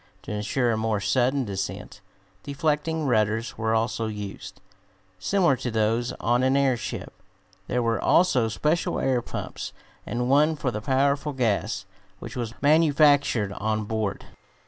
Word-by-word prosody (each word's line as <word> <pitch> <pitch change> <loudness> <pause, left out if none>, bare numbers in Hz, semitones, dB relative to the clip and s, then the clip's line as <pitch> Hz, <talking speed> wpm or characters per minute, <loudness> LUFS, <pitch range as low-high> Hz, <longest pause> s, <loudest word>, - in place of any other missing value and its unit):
To - - -7
insure 110 +4 0
a 110 - 0
more 110 -1 0
sudden 125 +7 +1
descent, 95 -2 -5 0.4
deflecting 150 +2 -1
rudders 110 -1 +1
were 110 0 0
also 115 0 0
used, 105 -2 -7 0.6
similar 175 - +2
to 125 - -3
those 115 +2 0
on 120 +2 +1
an 130 +1 +3
airship. 130 -4 -1 0.5
There 125 0 0
were 115 -1 0
also 145 -10 +3
special 150 +9 0
air 130 -2 +1
pumps, - - -6 0.3
and 125 +1 -2
one 150 +4 +4
for 140 -4 -2
the 105 - -4
powerful 140 +4 +1
gas, 105 -5 -1 0.3
which - - -9
was 115 -3 -5
manufactured 145 -8 +4
on 110 +2 -1
board. 110 -2 -3
120 Hz, 140 wpm, -25 LUFS, 110-140 Hz, 0.6 s, one